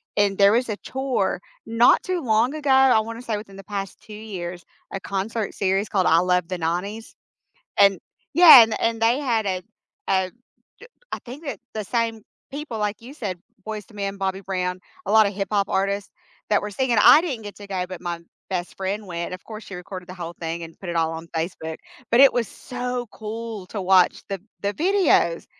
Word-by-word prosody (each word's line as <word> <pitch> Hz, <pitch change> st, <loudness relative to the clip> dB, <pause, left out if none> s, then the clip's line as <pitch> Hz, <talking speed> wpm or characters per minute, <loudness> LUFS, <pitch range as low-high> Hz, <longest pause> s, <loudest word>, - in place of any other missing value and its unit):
And 200 Hz, -2 st, +2 dB
there 200 Hz, 0 st, +6 dB
was 240 Hz, +1 st, +1 dB
a 210 Hz, -, -2 dB
tour 260 Hz, -9 st, -1 dB, 0.3 s
not 230 Hz, +2 st, +5 dB
too 370 Hz, -2 st, -2 dB
long 235 Hz, +1 st, +2 dB
ago, 300 Hz, -2 st, -3 dB
I 265 Hz, -3 st, +6 dB
wanna 230 Hz, +2 st, -7 dB
say 230 Hz, -3 st, -2 dB
within 205 Hz, -2 st, -10 dB
the 195 Hz, -, -10 dB
past 195 Hz, -1 st, -5 dB
2 215 Hz, -, -12 dB
years, 185 Hz, -5 st, -6 dB, 0.3 s
a 195 Hz, -, -2 dB
concert 200 Hz, +3 st, -3 dB
series 195 Hz, +1 st, 0 dB
called 190 Hz, -3 st, +2 dB
I 165 Hz, -, +5 dB
Love 180 Hz, -1 st, +1 dB
the 185 Hz, 0 st, -3 dB
'90s, 180 Hz, +7 st, -3 dB, 0.6 s
and 195 Hz, -2 st, +6 dB, 0.4 s
yeah, 330 Hz, -7 st, +11 dB
and 225 Hz, -1 st, 0 dB
and 230 Hz, 0 st, 0 dB
they 235 Hz, +3 st, +4 dB
had 235 Hz, -7 st, 0 dB
a 185 Hz, -1 st, -1 dB, 0.5 s
a 190 Hz, -1 st, +2 dB, 0.5 s
j 485 Hz, -, -12 dB, 0.3 s
I -, -, -2 dB
think 265 Hz, +6 st, -9 dB
the 280 Hz, -, -4 dB, 0.2 s
the 215 Hz, -1 st, -3 dB
same 225 Hz, +1 st, -1 dB, 0.3 s
people, 285 Hz, -5 st, -5 dB
like 210 Hz, 0 st, -2 dB
you 240 Hz, +4 st, -11 dB
said, 195 Hz, -, -5 dB, 0.3 s
Boyz 215 Hz, -2 st, -5 dB
II 210 Hz, -, -15 dB
Men, 200 Hz, 0 st, -3 dB
Bobby 190 Hz, 0 st, -2 dB
Brown, 185 Hz, -1 st, -2 dB, 0.3 s
a -, -, -1 dB
lotta 215 Hz, -2 st, +6 dB
hip 195 Hz, 0 st, -3 dB
hop 200 Hz, -1 st, +2 dB
artists 200 Hz, +1 st, -1 dB, 0.4 s
that 210 Hz, -, +4 dB
were 210 Hz, -, -4 dB
singing. 240 Hz, +1 st, +1 dB
I -, -, +9 dB
didn't 280 Hz, -10 st, -4 dB
get 205 Hz, -1 st, -9 dB
to 205 Hz, -, -10 dB
go, 190 Hz, -2 st, -2 dB
but 185 Hz, -2 st, -7 dB
my 175 Hz, -1 st, -4 dB, 0.3 s
best 180 Hz, -2 st, -3 dB
friend 200 Hz, +2 st, -3 dB
went. 170 Hz, -1 st, -4 dB
Of 185 Hz, -, -10 dB
course, 215 Hz, -1 st, -9 dB
she 195 Hz, -, -9 dB
recorded 180 Hz, 0 st, -8 dB
the -, -, -7 dB
whole 170 Hz, -2 st, -6 dB
thing 165 Hz, 0 st, -3 dB
and 165 Hz, 0 st, -13 dB
put 190 Hz, -, -7 dB
it 170 Hz, -, -3 dB
all 165 Hz, -1 st, +1 dB
on 165 Hz, +1 st, -7 dB
Facebook, 160 Hz, -1 st, -3 dB, 0.3 s
but 235 Hz, -, +5 dB
it 275 Hz, -1 st, +8 dB
was 235 Hz, -3 st, 0 dB
so 250 Hz, 0 st, -4 dB
cool 220 Hz, -2 st, -6 dB
to 210 Hz, -, -4 dB
watch 185 Hz, -1 st, +4 dB
the 195 Hz, -2 st, -4 dB, 0.2 s
the 200 Hz, +1 st, -1 dB
videos. 355 Hz, -, +2 dB
205 Hz, 210 wpm, -23 LUFS, 185-230 Hz, 0.6 s, yeah